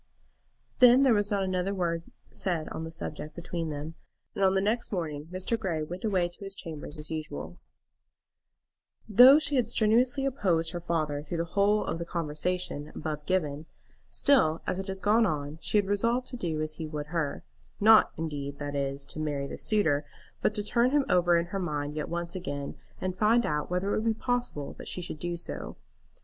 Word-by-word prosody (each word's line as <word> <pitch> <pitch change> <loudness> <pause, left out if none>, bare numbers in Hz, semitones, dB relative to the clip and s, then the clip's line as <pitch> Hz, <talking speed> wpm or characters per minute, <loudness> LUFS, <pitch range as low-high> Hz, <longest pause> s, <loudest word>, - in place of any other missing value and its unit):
Then 250 +1 +8
there 260 -3 +5
was 205 -1 +1
not 200 -2 +1
another 185 +1 -1
word 170 -3 -1 0.3
said 175 -5 0
on 160 - -5
the 160 - -6
subject 155 -1 -6
between 170 -1 -4
them, 150 +2 -5 0.4
and 195 - -1
on 190 0 +4
the - - +4
next 215 +5 0
morning 155 -6 -3
Mr. 185 +6 -2
Grey 170 -7 -1
went 175 +4 -7
away 190 -5 +2
to 175 - -15
his 195 0 -4
chambers 155 -5 -7
as 150 +1 -7
usual. 155 - -5 1.5
Though 245 +6 +9
she 290 -2 +1
had 235 -3 +2
strenuously 240 +5 +3
opposed 180 - +1
her 175 - -4
father 155 -4 -1
through 155 +3 -5
the 165 - -1
whole 205 +1 +3
of 165 - -3
the 170 - -3
conversation 165 -1 -3
above 150 -2 -4
given, 155 -4 -1 0.4
still, 170 - +3
as 185 - -1
it 195 - -5
had 190 0 -4
gone 220 +2 +4
on, 150 -1 -3
she - - +1
had 205 - +3
resolved 230 +5 +1
to 255 - -6
do 160 -7 -2
as 155 0 -3
he 160 - -3
would 150 -1 -5
her; 155 -4 -1 0.4
not 220 +1 +7
indeed, 145 -3 -4
that 145 0 -4
is, 140 0 -1
to 155 - -6
marry 145 -3 -2
this - - -7
suitor, 160 -10 +2 0.4
but 210 - +1
to 210 - +1
turn 235 +4 +3
him 285 0 +2
over 175 -1 +4
in 170 - 0
her 195 - 0
mind 150 -4 -3
yet 150 - -3
once 170 +1 -3
again, 145 -6 -4 0.2
and 185 -1 -3
find 225 +2 +4
out 150 0 -1
whether 180 +3 0
it - - +1
would 225 0 +1
be - - -19
possible 245 - -2
that - - -8
she - - -2
should 170 -3 -5
do 175 +1 -3
so. 170 - -5
175 Hz, 200 wpm, -29 LUFS, 155-210 Hz, 1.5 s, Though